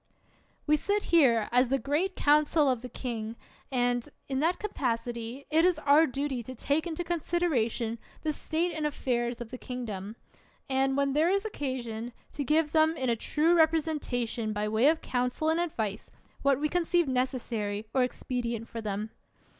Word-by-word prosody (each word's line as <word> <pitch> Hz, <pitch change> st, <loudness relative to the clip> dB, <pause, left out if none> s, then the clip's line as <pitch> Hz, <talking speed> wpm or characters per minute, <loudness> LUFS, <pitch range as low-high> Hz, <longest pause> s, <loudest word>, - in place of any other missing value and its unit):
We 300 Hz, 0 st, +4 dB
sit 405 Hz, +6 st, 0 dB
here 235 Hz, -10 st, +5 dB
as 250 Hz, +1 st, +4 dB
the 270 Hz, -, +2 dB
great 300 Hz, +8 st, -1 dB
council 300 Hz, +1 st, +4 dB
of 255 Hz, -3 st, +1 dB
the 250 Hz, -, -7 dB
king, 230 Hz, -2 st, -4 dB, 0.4 s
and, 245 Hz, 0 st, +1 dB, 0.2 s
in 265 Hz, -1 st, -1 dB
that 330 Hz, +5 st, +2 dB
capacity 240 Hz, -, -3 dB
it 320 Hz, +2 st, +4 dB
is 360 Hz, -2 st, +4 dB
our 310 Hz, +1 st, +5 dB
duty 275 Hz, -1 st, -2 dB
to 255 Hz, +3 st, -8 dB
take 290 Hz, +7 st, 0 dB
into 340 Hz, +1 st, -3 dB
consideration 290 Hz, -10 st, 0 dB, 0.2 s
the 310 Hz, -1 st, 0 dB
state 335 Hz, +4 st, -1 dB
and 310 Hz, -1 st, -1 dB
affairs 240 Hz, -4 st, -2 dB
of 230 Hz, -, -7 dB
the 255 Hz, -, -7 dB
king 250 Hz, -1 st, -5 dB
dom; 205 Hz, 0 st, -6 dB, 0.5 s
and, 270 Hz, 0 st, +1 dB
where 280 Hz, -, +3 dB
there 300 Hz, +5 st, +2 dB
is 395 Hz, +3 st, +1 dB
occasion, 245 Hz, -, -4 dB, 0.2 s
to 290 Hz, -, -3 dB
give 305 Hz, +2 st, +2 dB
them 315 Hz, 0 st, +3 dB
in 260 Hz, -2 st, +1 dB
a -, -, +2 dB
true 310 Hz, +8 st, +2 dB
representation 295 Hz, -9 st, +1 dB
by 210 Hz, 0 st, -1 dB
way 220 Hz, +5 st, +3 dB
of 320 Hz, +1 st, +3 dB
council 250 Hz, +5 st, -1 dB
and 325 Hz, +1 st, +2 dB
advice, 220 Hz, -, -2 dB, 0.3 s
what 275 Hz, -1 st, +3 dB
we 300 Hz, -, +1 dB
conceive 345 Hz, 0 st, +1 dB
necessary 235 Hz, -5 st, -1 dB
or 265 Hz, -, +3 dB
expedient 240 Hz, -2 st, -2 dB
for 230 Hz, -, -6 dB
them. 210 Hz, +1 st, -3 dB
265 Hz, 170 wpm, -29 LUFS, 235-315 Hz, 0.5 s, here